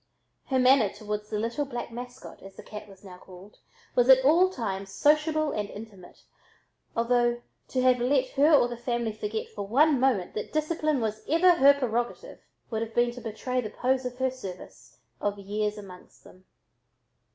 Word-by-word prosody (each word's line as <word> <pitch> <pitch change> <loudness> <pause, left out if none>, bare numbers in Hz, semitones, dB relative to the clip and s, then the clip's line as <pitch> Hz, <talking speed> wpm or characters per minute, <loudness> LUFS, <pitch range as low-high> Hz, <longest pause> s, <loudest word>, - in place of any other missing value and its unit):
Her 265 - 0
manner 255 -4 +5
toward 210 0 -5
the 215 - -3
"little 230 +7 -2
black 245 -4 -6
mascot," 245 +2 -9
as 195 0 -13
the - - -11
cat 210 0 -9
was 195 0 -16
now 180 -2 -12
called, 185 +3 -15 0.3
was 245 +1 +2
at 260 0 +7
all 345 +6 +5
times 195 - -4
sociable 305 +6 +2
and 210 -1 -3
intimate, 205 -4 -12 0.7
although 240 0 +1 0.2
to 255 - -1
have 255 -1 +4
let 260 +1 +1
her 290 +5 +3
or 285 -5 +5
the 240 -1 -7
family 235 -2 -2
forget 215 +1 -4
for 200 -1 -6
one 280 +5 +4
moment 245 -9 +1
that 210 - -5
discipline 310 -2 0
was 215 -1 -3
her 325 -4 +5
prerogative, 240 -2 -3 0.3
would 220 -1 -2
have 225 0 -5
been 240 0 +3
to 245 +1 -10
betray 250 +3 -3
the 215 - -5
pose 260 +3 0
of 250 0 -5
her 260 0 0
service 195 -8 -11 0.2
of 205 0 -2
years 210 +1 -3
among 185 -3 -11
them. 185 +1 -18
240 Hz, 175 wpm, -27 LUFS, 210-265 Hz, 0.7 s, at